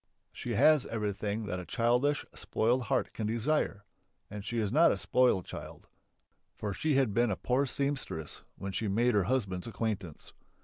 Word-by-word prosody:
She - - -4
has 155 -3 +5
everything 105 0 -2
that 90 -3 -3
a - - -5
childish, 125 +7 +1
spoiled 120 +3 0
heart 130 0 0
can 110 - -3
desire. 115 -3 0 0.5
And 105 -1 -6
she 115 +3 -4
is 105 -3 0
not 160 +5 +6
a - - 0
spoiled 125 -8 +2
child, - - -9 0.7
for 105 -2 -3
she 155 +7 0
had 130 -6 +2
been 120 +2 +3
a 100 - 0
poor 130 +7 0
seamstress 140 - -3
when 95 - -5
she 110 +3 -2
made 115 +5 +2
her 100 -3 +3
husband's 100 -8 -1
acquaintance. 100 -7 -4
115 Hz, 170 wpm, -31 LUFS, 100-130 Hz, 0.7 s, not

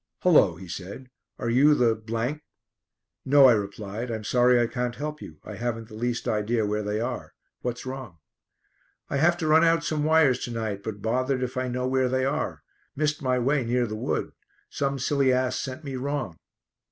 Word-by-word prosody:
"Hullo," 150 - +5
he 95 +2 -11
said. 95 +9 -8 0.3
"Are 120 -2 -2
you 145 +5 +5
the 120 -4 +3 0.9
?" - - -62
"No," 140 0 +6
I 125 - +8
replied. 105 +2 -4
"I'm 110 -2 -4
sorry 125 +2 +4
I 120 - +3
can't 125 0 -3
help 150 +2 -5
you. 75 - -10
I - - -8
haven't 115 -1 -3
the - - -13
least 120 +2 -2
idea 110 +1 0
where 105 +1 -1
they 105 +1 -2
are. 120 +2 -4 0.3
What's 125 0 -4
wrong?" 130 -9 -7 0.9
"I 140 - +1
have 170 +4 +3
to 160 - -2
run 160 +1 +5
out 165 0 +3
some 155 -2 -1
wires 155 -5 +4
to 120 - -6
night, 110 -4 -3
but 105 -1 -6
bothered 130 +3 0
if 125 0 -4
I 130 0 -1
know 125 +1 -2
where 130 -1 +1
they 130 0 +1
are. 135 - -2 0.3
Missed 150 +1 0
my 130 -2 +1
way 135 +3 +1
near 120 +1 +1
the 110 -2 -5
wood. 110 - -2 0.4
Some 140 0 -1
silly 135 0 +2
ass 130 0 +1
sent 135 +3 -5
me 135 -2 -5
wrong." 130 - -3
125 Hz, 195 wpm, -26 LUFS, 110-140 Hz, 0.9 s, I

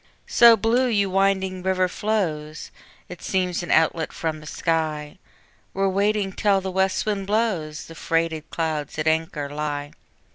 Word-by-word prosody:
So 235 -1 +7
blue 235 +5 +2
you 200 -5 +1
winding 190 -1 +1
river 185 0 +1
flows, 165 -7 -2 0.4
It 180 - -10
seems 180 -2 -1
an 175 - -7
outlet 160 0 +2
from 160 -2 -3
the 155 - -12
sky, 155 -1 -2 0.5
Where 195 0 +1
waiting 200 +1 +1
till 200 0 +2
the 190 0 -4
west 190 0 +1
wind 200 -2 -2
blows, 195 -8 -1
The 165 - -11
freighted 165 -1 -1
clouds 155 -3 -3
at 155 - -1
anchor 160 -2 0
lie. 145 0 -4
180 Hz, 150 wpm, -23 LUFS, 155-195 Hz, 0.5 s, So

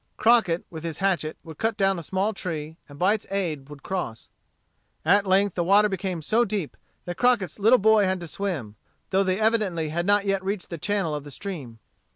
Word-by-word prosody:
Crockett, 220 -7 +3
with 160 -2 -7
his 165 -2 -4
hatchet, 180 -5 0
would 160 -3 -11
cut 225 -1 0
down 195 -3 +2
a - - -5
small 190 +6 -1
tree, 160 -5 -5
and 145 - -12
by 185 +6 +3
its 215 - -4
aid 165 -8 -2
would 145 -2 -11
cross. 175 -12 -4 0.8
At 200 0 +4
length 195 0 +3
the 175 - 0
water 205 +4 +5
became 185 -3 -3
so 225 +9 +3
deep 200 -8 -3 0.3
that 175 0 -5
Crockett's 245 -6 +2
little 225 +5 +6
boy 220 -1 +4
had 185 0 0
to 170 - -6
swim, 150 - -4 0.3
though 195 +1 +3
they 185 +1 0
evidently 210 -8 +1
had 170 +3 -2
not 205 0 +3
yet 195 -1 0
reached 195 -1 -3
the 170 - -5
channel 195 -3 -1
of 150 -1 -4
the 145 - -10
stream. 145 - -7
190 Hz, 205 wpm, -25 LUFS, 165-205 Hz, 0.8 s, little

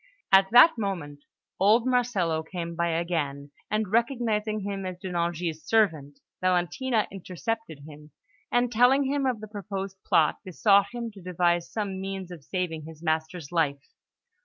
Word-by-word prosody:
At 195 0 +6
that 245 +4 +7
moment, 165 -9 -4 0.3
old 220 +5 +4
Marcello 225 -11 +1
came 170 +1 -6
by 170 0 0
again; 160 -4 -2 0.2
and, 215 -2 -1
recognising 225 -3 0
him 195 0 -4
as 185 -1 -5
De 185 +1 -7
Nangis' 170 -2 -2
servant, 160 -11 +1 0.2
Valentina 185 +6 +1
intercepted 195 -2 -5
him, 150 0 -13 0.4
and, 245 0 +2
telling 250 +4 +4
him 275 0 0
of 240 -4 -1
the 215 - -7
proposed 195 -2 -6
plot, - - +3
besought 200 +2 +3
him 235 -1 -5
to 200 -2 -14
devise 175 -1 0
some 200 -3 -3
means 195 -2 -5
of 165 -5 -10
saving 165 -2 -3
his 160 0 -12
master's 160 -1 -2
life. 140 -5 -1
190 Hz, 150 wpm, -27 LUFS, 170-220 Hz, 0.4 s, that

